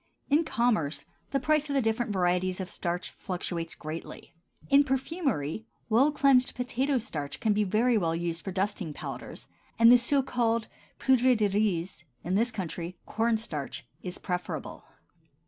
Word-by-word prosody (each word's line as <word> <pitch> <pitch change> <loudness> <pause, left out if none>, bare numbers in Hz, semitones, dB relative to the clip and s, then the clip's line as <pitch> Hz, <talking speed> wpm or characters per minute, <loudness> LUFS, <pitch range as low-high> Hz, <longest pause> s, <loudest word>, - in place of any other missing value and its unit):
In 305 +3 +5
commerce 225 - 0 0.2
the 275 - 0
price 305 +1 +1
of 280 - -1
the 270 - +4
different 225 0 0
varieties 180 0 +1
of 185 -1 -4
starch 175 +1 -3
fluctuates 175 -3 -4
greatly; 160 +2 -8 0.3
in 280 0 +6
perfumery 265 - -2 0.2
well 255 +7 +5
cleansed 275 -3 +4
potato 260 +2 0
starch 150 - -4
can 220 -2 +2 0.2
very 230 +3 +3
well 165 -3 0
be 165 - -2
used 170 -1 -2
for 190 - -4
dusting 190 -3 -2
powders, - - -7 0.3
and 230 +1 +8
the 245 - +8
so 270 +3 +2
called 230 -3 0 0.3
poudre 260 -1 +4
de 215 -2 +2
riz; 190 -4 0 0.2
in 180 - -2
this 230 +5 +2
country, 175 -3 -5
corn 225 +1 +1
starch 150 - -5 0.2
is 180 -1 -6
preferable. 180 -1 -4
220 Hz, 155 wpm, -29 LUFS, 180-250 Hz, 0.3 s, and